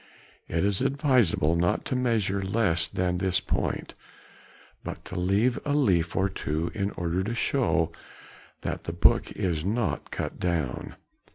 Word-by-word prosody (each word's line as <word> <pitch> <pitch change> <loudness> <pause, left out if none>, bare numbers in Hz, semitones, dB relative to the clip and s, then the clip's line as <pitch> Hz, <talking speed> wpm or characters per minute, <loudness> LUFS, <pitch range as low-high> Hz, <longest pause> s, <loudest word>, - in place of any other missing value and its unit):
It 85 +3 0
is 100 +1 +1
advisable 130 - +3
not 85 +1 +1
to - - -1
measure 110 -6 +1
less 95 -5 +1
than 90 -1 -1
this 95 -1 +1
point, - - -2 0.9
but - - -7
to - - -8
leave 100 +7 +2
a 145 -1 0
leaf 90 - +2
or 95 0 +3
two 80 -3 -2
in 100 -2 -1
order 90 +2 0
to 115 +4 -3
show 100 - +1 0.7
that - - -4
the 85 - -3
book 85 - +3
is 85 -5 -1
not 100 -4 -1
cut - - -4
down. 80 -8 -2
95 Hz, 150 wpm, -27 LUFS, 85-115 Hz, 0.9 s, advisable